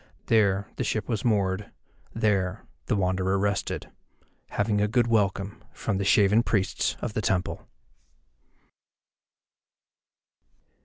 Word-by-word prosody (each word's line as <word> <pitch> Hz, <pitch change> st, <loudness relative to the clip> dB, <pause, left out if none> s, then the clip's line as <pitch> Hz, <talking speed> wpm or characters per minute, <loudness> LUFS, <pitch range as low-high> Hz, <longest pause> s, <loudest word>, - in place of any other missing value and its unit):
There 100 Hz, -3 st, +3 dB
the -, -, -1 dB
ship 110 Hz, -3 st, -2 dB
was 110 Hz, -4 st, -2 dB
moored, 100 Hz, -3 st, +1 dB, 0.4 s
there 100 Hz, -2 st, 0 dB, 0.2 s
the 120 Hz, -, +1 dB
Wanderer 95 Hz, 0 st, +1 dB
rested, 100 Hz, 0 st, -2 dB, 0.6 s
having 105 Hz, 0 st, 0 dB
a 105 Hz, -, +3 dB
good 120 Hz, +2 st, +2 dB
welcome 100 Hz, -3 st, 0 dB
from 95 Hz, -, -2 dB
the -, -, 0 dB
shaven 100 Hz, +2 st, +5 dB
priests 100 Hz, -5 st, 0 dB
of 115 Hz, -, -3 dB
the 110 Hz, -, -1 dB
temple. 95 Hz, -3 st, -1 dB
100 Hz, 110 wpm, -26 LUFS, 95-110 Hz, 0.6 s, shaven